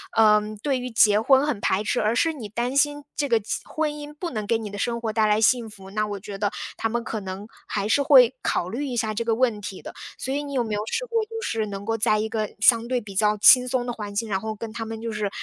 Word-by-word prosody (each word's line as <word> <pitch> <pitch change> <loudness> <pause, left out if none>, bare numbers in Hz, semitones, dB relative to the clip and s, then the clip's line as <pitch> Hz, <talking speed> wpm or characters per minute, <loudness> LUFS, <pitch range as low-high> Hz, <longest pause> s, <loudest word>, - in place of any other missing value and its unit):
呃， 210 -1 +5 0.2
对 275 -3 0
于 250 0 -5
结 215 -3 +4
婚 265 +4 +4
很 295 -8 -2
排 195 +1 0
斥， 245 - 0
而 215 +2 +1
是 325 +6 +2
你 260 -9 -7
担 240 +5 -3
心 290 0 +2
这 290 - 0
个 235 -3 +3
结 205 - -3
婚 310 -1 -2
姻 295 0 -8
不 340 +4 -5
能 215 -6 -4
给 230 - +2
你 220 -2 -6
的 205 - -8
生 235 +3 -2
活 225 -2 -2
带 215 0 +2
来 210 +1 +2
幸 230 0 +3
福， 195 -2 -13
那 215 +1 -1
我 205 -1 -4
觉 195 +1 -8
得 205 0 0 0.3
他 225 - 0
们 235 +1 -2
可 220 - -4
能 195 +1 -7 0.2
还 200 -1 -2
是 285 - +3
会 265 -4 +6
考 175 - -1
虑 255 +9 -3
一 250 - -4
下 220 -2 -1
这 230 +2 -3
个 225 -1 +1
问 235 -3 +1
题 200 -2 -7
的。 - - -9 0.2
所 265 - -3
以 285 - -1
你 285 -1 -7
有 255 -3 +1
没 220 -2 -4
有 205 - -1
试 - - -2
过， 460 -2 0
就 450 +1 -7
是 225 - -1
能 200 -1 -6
够 225 +2 -1
在 215 -1 +2
一 220 +1 -2
个 215 -2 -2
相 230 +2 +4
对 250 0 -1
比 205 -3 -10
较 210 +1 +3
轻 250 +4 +7
松 250 -1 -1
的 245 - -3
环 210 -3 -7
境， 225 +1 -2
然 190 -2 0
后 220 +1 -5
跟 220 +1 -7
他 225 0 -5
们 225 0 -7
就 230 0 -4
是 210 -1 -2
225 Hz, 310 characters per minute, -24 LUFS, 210-255 Hz, 0.3 s, 轻